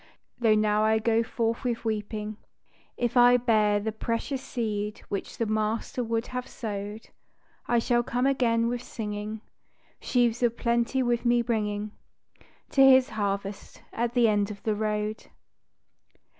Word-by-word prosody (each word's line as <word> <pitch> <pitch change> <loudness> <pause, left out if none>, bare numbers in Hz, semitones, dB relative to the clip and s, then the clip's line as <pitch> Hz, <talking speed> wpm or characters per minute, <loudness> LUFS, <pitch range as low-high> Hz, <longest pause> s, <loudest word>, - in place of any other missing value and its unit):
Though 225 -3 +4
I - - +4
now 215 +1 +3
go 225 +1 +2
forth 230 +1 -2
with 235 -2 -2
weeping, 215 -1 -3 0.6
If 240 0 -1
I 245 0 +7
bear 215 -4 +2
the 220 +2 -2
precious 230 +5 -3
seed 215 -5 -3
which 200 - -4
the 230 - 0
Master 215 +3 -1
would 230 0 -1
have 250 0 -5
sowed, 210 -1 -6 0.6
I 240 - +2
shall 240 +1 +2
come 245 +2 -1
again 235 -4 +2
with 240 0 -2
singing, 210 -2 -5 0.6
Sheaves 240 -2 +1
of 235 -1 +1
plenty 235 +2 +1
with 240 -1 0
me 240 0 +3
bringing 210 -3 -2 0.8
To 270 - +3
His 260 -1 +7
harvest 200 -2 -4
at 235 +1 -2
the 240 -2 +5
end 205 -1 +1
of 200 -2 -9
the 215 - +1
road. 210 0 -2
225 Hz, 145 wpm, -27 LUFS, 210-240 Hz, 0.8 s, I